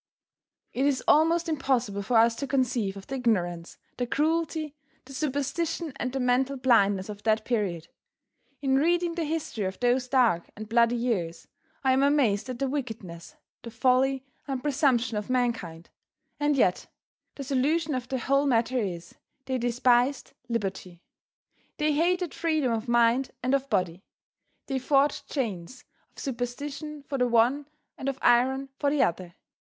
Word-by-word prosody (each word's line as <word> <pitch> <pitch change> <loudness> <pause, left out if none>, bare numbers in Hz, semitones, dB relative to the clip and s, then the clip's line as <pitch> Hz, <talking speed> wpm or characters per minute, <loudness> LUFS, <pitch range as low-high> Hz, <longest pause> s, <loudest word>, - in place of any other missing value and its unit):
It 270 +3 +1
is 270 -3 0
almost 330 +3 +4
impossible 260 -9 0
for 225 +4 +1
us 230 +1 +5
to 280 - -3
conceive 240 -7 0
of 195 - -10
the - - -7
ignorance, 175 -8 -1 0.2
the 245 - -2
cruelty, 315 +1 -1 0.3
the 270 - -12
superstition 300 +3 -2
and 255 - -2
the 270 - -3
mental 255 +2 +1
blindness 205 -7 +3
of 205 -1 -8
that 220 0 +1
period. 190 -9 -1 0.8
In 265 -1 +3
reading 345 +3 +2
the 335 -1 -2
history 300 -9 -3
of 190 0 -4
those 245 +1 +1
dark 245 -10 +2
and 215 +1 -8
bloody 235 +1 +3
years, 190 -9 -2 0.4
I 260 -1 +4
am 265 - +3
amazed 260 -6 +2
at 250 - -4
the 275 - -1
wickedness, 225 -11 -6 0.3
the 235 - -8
folly 260 +3 +2 0.2
and 265 -2 -3
presumption 260 -6 +1
of 210 +2 -4
mankind. 230 -10 -2 0.5
And 295 0 +2
yet, 185 -8 +2 0.5
the 280 - -6
solution 290 +4 0
of 255 -1 -3
the 260 0 -2
whole 275 +4 +1
matter 245 0 +2
is, 175 -5 -4 0.3
they 260 -1 -2
despised 245 +2 +1 0.2
liberty; 190 -6 -4 0.7
they 300 0 +1
hated 350 +2 +1
freedom 315 -6 0
of 225 +1 -2
mind 240 +2 +3
and 255 +2 +1
of 275 0 0
body. 185 -4 -1 0.6
They 270 -1 -2
forged 275 +2 +1
chains 220 - -4 0.3
of - - -35
superstition 280 +4 -5
for 275 -1 -4
the 250 - +3
one 245 +5 +2 0.3
and 270 - -2
of 270 - -4
iron 265 +3 +3
for 285 - +2
the 290 0 +3
other. 175 0 -2
255 Hz, 155 wpm, -27 LUFS, 225-280 Hz, 0.8 s, us